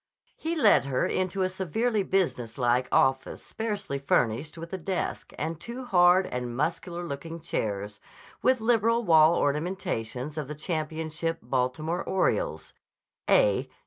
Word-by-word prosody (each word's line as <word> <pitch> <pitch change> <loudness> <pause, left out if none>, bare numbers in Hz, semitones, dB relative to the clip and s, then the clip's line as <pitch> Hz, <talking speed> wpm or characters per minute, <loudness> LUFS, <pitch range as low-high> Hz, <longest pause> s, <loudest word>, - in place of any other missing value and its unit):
He 330 +1 -3
led 305 - +5
her 130 -2 0
into 185 +1 -1
a - - +2
severely 200 +5 -1
business 170 - -1
like 125 0 +1
office 135 0 +1
sparsely 205 -10 -4
furnished 140 +3 0
with 165 +2 -8
a - - -1
desk 185 +2 -3
and 160 +1 -3
two 240 +6 -7
hard 180 -3 +5
and 125 -4 -4
muscular 170 +4 -2
looking 165 +1 -6
chairs, 105 -9 -3 0.4
with 255 -2 +3
liberal 230 0 +2
wall 160 -3 +6
ornamentations 145 - -2
of 150 - -4
the 150 - -6
championship 160 +1 -3
Baltimore 130 +7 -1
"Orioles" 485 - -1 0.6
("A. - - +3
165 Hz, 135 wpm, -27 LUFS, 140-190 Hz, 0.6 s, wall